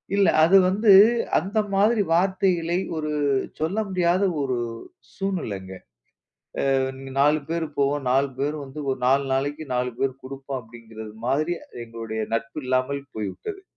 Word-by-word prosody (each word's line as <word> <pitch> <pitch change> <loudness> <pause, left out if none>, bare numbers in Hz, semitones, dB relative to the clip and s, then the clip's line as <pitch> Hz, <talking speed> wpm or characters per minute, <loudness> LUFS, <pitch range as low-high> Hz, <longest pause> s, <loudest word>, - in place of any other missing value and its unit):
இல்ல. 200 -1 +4 0.2
அது 185 +4 +6
வந்து 205 +3 +3 0.5
அந்த 200 +6 -2
மாதிரி 210 +3 +3
வார்த்தைகளை, 180 -1 +1 0.2
ஒரு 155 -1 -2 0.5
சொல்ல 165 +7 -1
முடியாத 180 0 +1 0.2
ஒரு 130 -3 -1 0.6
சூழ்நிலைங்க. 105 - -4 1.0
அ - - +4 0.2
நீங்க 135 0 -9
4 150 +2 +4
பேரு 165 -1 -1
போவோம் 140 -1 +1
4 135 +1 +2
பேரு 145 +2 -1
வந்து 135 +3 -9
ஒரு 130 - -3
4 135 +2 +3
நாளைக்கு 145 +3 -2
4 125 0 0
பேர் 135 -1 -1
குடுப்போம். 135 0 -6
அப்படிங்கிறது 110 -2 -11
மாதிரி 155 +6 +1 0.3
எங்களுடைய 115 -1 -5
நட்பு 135 +5 -2
இல்லாமல் 130 +2 0
போய்விட்டது. 110 - -5
140 Hz, 135 wpm, -24 LUFS, 130-175 Hz, 1.0 s, அது